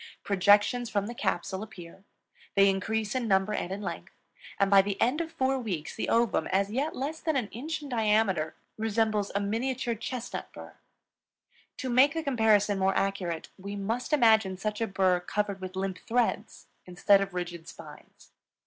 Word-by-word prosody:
Projections 205 +5 +3
from 205 -3 0
the 235 - -5
capsule 190 -4 -2
appear; 190 -3 -11 0.5
they 195 0 +6
increase 215 +2 -2
in 255 -3 -1
number 195 +1 +2
and 180 - -3
in 200 +2 -4
length; - - -6 0.5
and 200 0 +2
by 195 -1 +8
the 200 0 -4
end 260 +8 +2
of 325 -1 -5
four 265 -1 0
weeks 185 -10 -4
the - - -3
ovum, 230 -2 +2
as 195 +2 0
yet 280 +7 -1
less 295 +5 -4
than 315 -2 -1
an 240 -6 -1
inch 305 +7 -5
in 285 - -8
diameter, 210 - +1 0.2
resembles 220 -2 0
a - - +2
miniature 235 +4 -1
chestnut 240 +2 -6
burr. - - -11 1.0
To 260 - -4
make 270 +5 +5
the 325 - -2
comparison 215 -6 +3
more 190 0 +2
accurate, 185 -4 -2
we 200 +2 -6
must 225 +7 -3
imagine 220 -9 +4
such 210 +3 -3
a 225 - +1
burr 190 -2 +2
covered 200 +2 -3
with 185 0 -7
limp 190 -1 -3
threads 240 0 -1 0.2
instead 195 +2 +4
of 195 -2 -4
rigid 175 -2 -5
spines. - - -13
210 Hz, 175 wpm, -28 LUFS, 195-240 Hz, 1.0 s, by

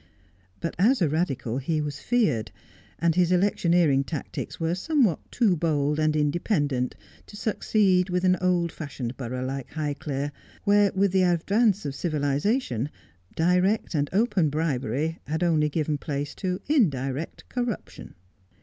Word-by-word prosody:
But 165 - -3
as 245 +8 +4
a 170 - +3
Eadical 135 -6 -1
he 155 +3 -1
was 150 -2 -3
feared, 165 - +1 0.5
and 170 -1 +2
his 180 +1 +2
electioneering 175 -6 +3
tactics 150 0 -5
were 165 0 0
somewhat 235 - +2
too 220 -7 +3
bold 150 -2 0
and 155 0 +2
independent 145 - 0 0.3
to 205 - -11
succeed 195 -4 +2
with 180 0 0
an 185 0 +4
old 175 -2 +1
fashioned 130 -5 -6
borough 130 0 -4
like 135 0 -4
Highclere, 145 -2 -3 0.3
where, 205 -1 +4
with 195 0 +2
the 190 0 +3
advance 195 +4 +2
of 140 - -2
civilization, 145 - 0 0.5
direct 180 +6 +2
and 145 -2 0
open 195 -5 +2
bribery 150 0 -1
had 160 +4 -1
only 155 -3 +2
given 150 -1 -1
place 145 -1 -3
to 185 -1 -3
indirect 150 - 0
corruption. 230 - -5
165 Hz, 140 wpm, -26 LUFS, 145-185 Hz, 0.5 s, as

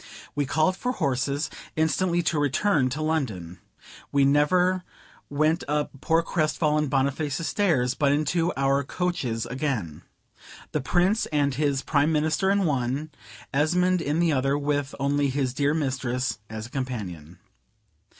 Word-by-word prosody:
We 145 -2 -1
called 160 +6 +2
for 250 +6 -2
horses, 140 - -1 0.3
instantly 170 +3 +1
to 160 -1 +1
return 145 0 +2
to 150 +5 -3
London. 110 - -2 0.5
We 140 -1 +4
never 180 +6 +3 0.5
went 155 +3 +1
up 150 0 0
poor 165 +1 +2
crestfallen 155 -2 +1
Boniface's 140 +3 0
stairs, 145 -12 +2
but 140 0 +2
into 165 +4 +1
our 135 +1 +2
coaches 135 -8 -2
again. 125 - -3 0.7
The 150 - -1
Prince 180 - +2
and 145 -3 +1
his 140 -1 0
Prime 150 +1 +2
Minister 160 +5 +1
in 200 -1 +2
one, 140 +1 -1 0.4
Esmond 180 +5 +2
in 150 +1 -1
the 170 -2 +3
other, 135 +1 +1
with 145 -1 -1
only 140 +1 +1
his 130 -2 -1
dear 145 +3 +1
mistress 130 -4 -1
as 110 0 -6
a 120 - -12
companion. 95 - -5
145 Hz, 140 wpm, -25 LUFS, 135-160 Hz, 0.7 s, We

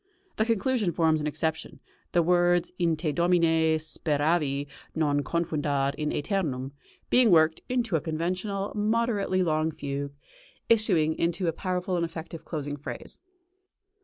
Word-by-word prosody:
The 220 - +2
conclusion 230 -2 +1
forms 160 -2 +2
an 150 - -1
exception, 160 +1 -3 0.3
the 175 - +3
words, 175 0 +3
"In 170 -2 +2
Te 155 -1 -1
Domine 165 -1 +3
speravi, 150 -2 0 0.3
non 145 -3 +1
confundar 145 -3 0
in 150 0 -2
ætemum" 145 -7 -2 0.4
being 250 -2 +5
worked 160 -2 +4
into 240 -7 0
a 160 - +1
conventional, 185 +6 -2
moderately 210 -3 +1
long 155 -1 +1
fugue, 140 -1 -5 0.5
issuing 185 -9 +3
into 170 +2 0
a 165 - +1
powerful 180 +1 -2
and 170 - 0
effective 165 0 -6
closing 145 -3 -4
phrase. 145 - -8
165 Hz, 130 wpm, -27 LUFS, 155-185 Hz, 0.5 s, being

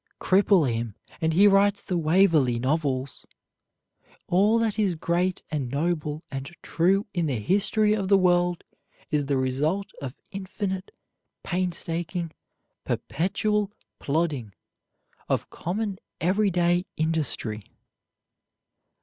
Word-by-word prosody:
Cripple 190 -3 +4
him, 115 -3 -2 0.3
and 160 0 +2
he 195 +5 +6
writes 200 0 +5
the 185 - -2
Waverley 160 -6 +3
Novels. 135 0 -1 1.0
All 205 +5 +3
that 225 -2 0
is 195 -5 +2
great 175 +3 0
and 140 -5 -2
noble 150 +1 -1
and 135 0 -4 0.2
true 190 +4 +2
in 170 -3 0
the 135 -5 -1
history 205 - +2
of 200 -3 -1
the 195 0 +6
world 175 -2 +2 0.5
is 145 -2 +1
the 140 -1 +1
result 150 +10 0
of 135 -1 -5 0.2
infinite 190 -1 -4 0.5
painstaking, 175 -1 -2 0.5
perpetual 205 +3 0 0.3
plodding, 140 - -1 0.8
of - - -1
common 195 +2 -3 0.2
every 195 +4 +2
day 175 0 +1
industry. 150 -9 -1
175 Hz, 110 wpm, -26 LUFS, 150-195 Hz, 1.0 s, he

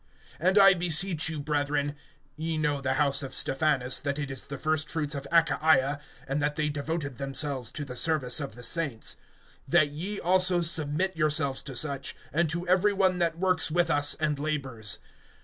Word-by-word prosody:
(15)And 185 +4 +2
I 195 -1 +8
beseech 170 -1 +2
you, 160 -2 -5
brethren, 145 0 -1 0.4
(ye 160 0 -3
know 150 -2 -1
the 130 -1 -1
house 140 -1 +2
of 135 - -5
Stephanas, 135 -3 +2
that 140 -1 -3
it 140 -2 -4
is 130 - -3
the 140 - -8
first 155 +1 -1
fruits 150 -2 -3
of 140 -1 -6
Achaia, 155 -4 +2 0.3
and 135 +2 -2
that 145 0 -1
they 150 -1 -1
devoted 145 -2 -4
themselves 135 -2 0
to 145 - -4
the 125 -2 -8
service 140 -3 +2
of 140 -6 -6
the 125 - -11
saints,) 145 -9 -1 0.5
(16)that 155 -3 +3
ye 195 +7 -5
also 180 0 +2
submit 165 +3 0
yourselves 150 -3 +1
to 135 -3 -8
such, 140 0 -1 0.2
and 165 +1 +1
to 170 +3 -3
every 190 +3 +3
one 190 -2 +1
that 165 -1 0
works 185 -1 +3
with 170 +1 +1
us, 145 -1 +3
and 150 -2 -2
labors. 135 -8 -2
150 Hz, 185 wpm, -27 LUFS, 140-165 Hz, 0.5 s, I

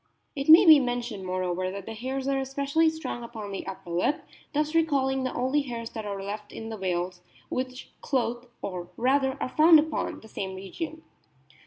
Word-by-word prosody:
It 275 +1 -3
may 335 +5 +10
be 315 -3 +10
mentioned, 240 -6 -3
moreover, 185 0 -1
that 195 0 -6
the 225 - -6
hairs 260 +4 -3
are 275 -1 +1
especially 280 +4 +1
strong 315 -6 -5
upon 220 -4 -7
the 195 - -5
upper 185 -2 -7
lip, 180 - 0 0.3
thus 300 +1 0
recalling 275 -5 +2
the 255 - -2
only 260 +4 +1
hairs 235 -4 -5
that 220 -2 -5
are 200 -1 -4
left 205 +1 -6
in 225 0 -7
the 220 - -5
whales, 180 -1 -2 0.3
which 255 0 -4
clothe, 240 -2 -1 0.2
or 180 -3 -5
rather 265 +2 +2
are - - -1
found 315 +4 +7
upon, 310 0 -2
the 220 - -13
same 190 -3 -5
region. 315 - -6
245 Hz, 185 wpm, -27 LUFS, 200-280 Hz, 0.3 s, may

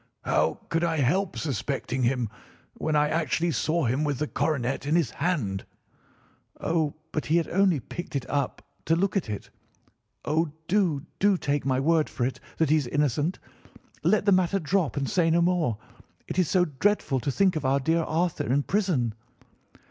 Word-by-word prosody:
"How - - +1
could 165 +1 0
I 165 -1 +1
help 165 +8 +1
suspecting 135 -2 -2
him, 125 -1 +1 0.5
when 155 - -2
I 150 0 +4
actually 165 +1 0
saw 160 +1 0
him 130 +6 +1
with 145 -3 0
the 150 - -1
coronet 140 -3 -1
in 155 - +2
his 160 -10 +2
hand?" 135 - -1 1.0
"Oh, 160 -3 0 0.2
but 155 - -3
he 160 - +3
had 170 - +1
only 185 -4 +3
picked 160 +7 -7
it 130 -3 -2
up 140 -2 -2 0.2
to 165 - +3
look 190 +3 0
at 185 - 0
it. 105 - -6 0.7
Oh, 155 0 0
do, 175 -7 +1
do 200 -1 +4
take 145 -4 -1
my 130 -1 +2
word 160 +2 +2
for 120 - -2
it 130 - -3 0.2
that 160 -3 +2
he 155 - +6
is 145 -5 -1
innocent. 145 +5 0 0.6
Let 190 +6 +2
the 200 - +4
matter 185 0 +3
drop 175 -3 0
and 140 - 0
say 180 -5 +2
no 165 +1 +3
more. 170 - +1 0.5
It - - -2
is 180 - +2
so 180 -2 +3
dreadful 155 -2 +1
to 125 - -2
think 190 +5 +2
of 155 - -2
our 135 +1 +2
dear 165 +5 +1
Arthur 160 -4 -1
in 140 +2 +2
prison!" 175 - 0
155 Hz, 185 wpm, -26 LUFS, 135-175 Hz, 1.0 s, he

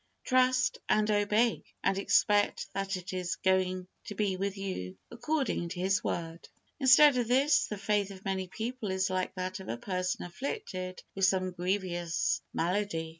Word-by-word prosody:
Trust 255 -1 +2
and 215 0 +3
obey, 210 +2 +2 0.2
and 195 - +2
expect 205 +1 +2
that 195 0 -2
it 185 +1 -7
is 180 -2 -2
going 185 +1 +1 0.2
to 205 - -7
be 200 -2 0
with 195 +1 -3
you 95 - -5
according 260 - -1
to 175 - -6
His 190 +2 +1
Word. 165 0 -4 0.3
Instead 270 +1 +7
of 240 -2 0
this, 280 +4 +3
the 210 - -5
faith 205 0 0
of 190 -1 -11
many 190 -1 -2
people 225 +2 -4
is 190 0 0
like 185 0 -2
that 185 +1 -4
of 190 - -9
a 115 - -2
person 185 +7 -2
afflicted 185 - -5
with 195 -1 +2
some 185 -1 +1
grievous 180 -2 -1
malady. 170 -2 -1
195 Hz, 165 wpm, -30 LUFS, 185-215 Hz, 0.3 s, Instead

